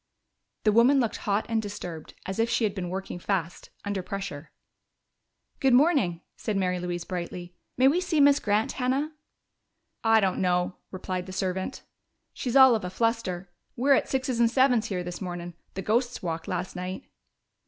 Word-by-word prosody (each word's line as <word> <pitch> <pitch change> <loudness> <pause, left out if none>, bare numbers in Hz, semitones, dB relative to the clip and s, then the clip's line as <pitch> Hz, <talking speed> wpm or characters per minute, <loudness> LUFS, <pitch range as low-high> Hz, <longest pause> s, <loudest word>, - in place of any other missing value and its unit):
The 215 - +4
woman 240 +6 +5
looked 230 -4 0
hot 205 +2 +2
and 225 -1 0
disturbed, 180 -6 -7
as 190 +3 -4
if 230 +1 +2
she 235 - +1
had 210 -3 +1
been 185 -3 -4
working 190 -1 -5
fast, 175 -2 -2 0.2
under 200 -1 -2
pressure. 180 -5 -6 1.1
"Good 265 -2 +4
morning," 255 - +3
said 215 -3 -2
Mary 180 -1 0
Louise 175 -1 -3
brightly. 175 -1 -5 0.2
"May 260 +1 +5
we 330 +6 +3
see 355 -4 0
Miss 285 0 +6
Grant, 210 +1 +1
Hannah?" 270 +4 -1 0.9
"I 225 -1 +5
don't 195 -3 0
know," 180 0 +1
replied 185 -1 -4
the - - -7
servant. 190 +5 -3 0.5
"She's 250 0 -3
all 265 -2 +9
of 220 - 0
a 180 - -3
fluster. 190 -4 -1 0.2
We're 275 +4 +4
at - - +2
sixes 260 -2 -1
and 235 -1 +5
sevens 250 -3 +3
here 185 -4 -2
this 175 +2 -6
mornin'. 175 -2 -5 0.2
The 190 - -4
ghosts 240 +3 0
walked 165 -2 -3
last 180 +1 -3
night." 180 +1 -5
200 Hz, 175 wpm, -27 LUFS, 180-240 Hz, 1.1 s, all